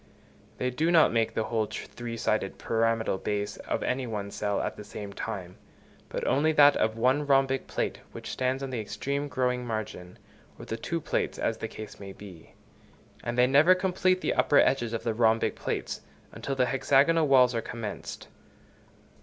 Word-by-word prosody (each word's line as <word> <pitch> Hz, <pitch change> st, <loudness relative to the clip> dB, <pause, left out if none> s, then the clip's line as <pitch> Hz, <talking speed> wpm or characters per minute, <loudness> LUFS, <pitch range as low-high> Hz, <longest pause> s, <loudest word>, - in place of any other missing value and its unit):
They 125 Hz, 0 st, -1 dB
do 155 Hz, +7 st, 0 dB
not 165 Hz, -8 st, +5 dB
make 115 Hz, -1 st, +1 dB
the 110 Hz, -, +1 dB
whole 110 Hz, -1 st, -1 dB
three 120 Hz, +1 st, -6 dB
sided 110 Hz, -3 st, -1 dB
pyramidal 115 Hz, -3 st, 0 dB
base 105 Hz, -1 st, -2 dB
of -, -, -3 dB
any 130 Hz, -1 st, -1 dB
one 105 Hz, -3 st, -4 dB
cell 105 Hz, 0 st, -1 dB
at -, -, -2 dB
the -, -, -9 dB
same 100 Hz, -1 st, -8 dB
time, 95 Hz, -4 st, -6 dB, 0.5 s
but -, -, -3 dB
only 150 Hz, +4 st, +3 dB
that 145 Hz, -7 st, +5 dB
one 130 Hz, +5 st, +2 dB
rhombic 135 Hz, -1 st, +2 dB
plate -, -, -2 dB
which -, -, -7 dB
stands 130 Hz, +1 st, -1 dB
on 135 Hz, -, -4 dB
the 125 Hz, -, -2 dB
extreme 140 Hz, +7 st, -3 dB
growing 125 Hz, -2 st, 0 dB
margin, 110 Hz, -6 st, -5 dB, 0.4 s
or -, -, -10 dB
the 115 Hz, -, -4 dB
two 165 Hz, +8 st, -3 dB
plates, -, -, -1 dB
as -, -, -1 dB
the -, -, -3 dB
case 110 Hz, -1 st, -9 dB
may 95 Hz, -1 st, -8 dB
be; 95 Hz, -6 st, -13 dB, 0.7 s
and 120 Hz, +1 st, -3 dB
they 125 Hz, -, +6 dB
never 145 Hz, +8 st, +6 dB
complete 185 Hz, 0 st, +1 dB
the -, -, 0 dB
upper 145 Hz, -, +3 dB
edges 120 Hz, -5 st, +3 dB
of 115 Hz, -, -3 dB
the 115 Hz, -, 0 dB
rhombic 115 Hz, 0 st, +2 dB
plates, -, -, -4 dB, 0.3 s
until 135 Hz, -, -4 dB
the 130 Hz, -1 st, +3 dB
hexagonal 145 Hz, +5 st, +3 dB
walls 130 Hz, -2 st, +5 dB
are 115 Hz, -, -1 dB
commenced. 110 Hz, -4 st, -6 dB
120 Hz, 180 wpm, -28 LUFS, 110-135 Hz, 0.7 s, they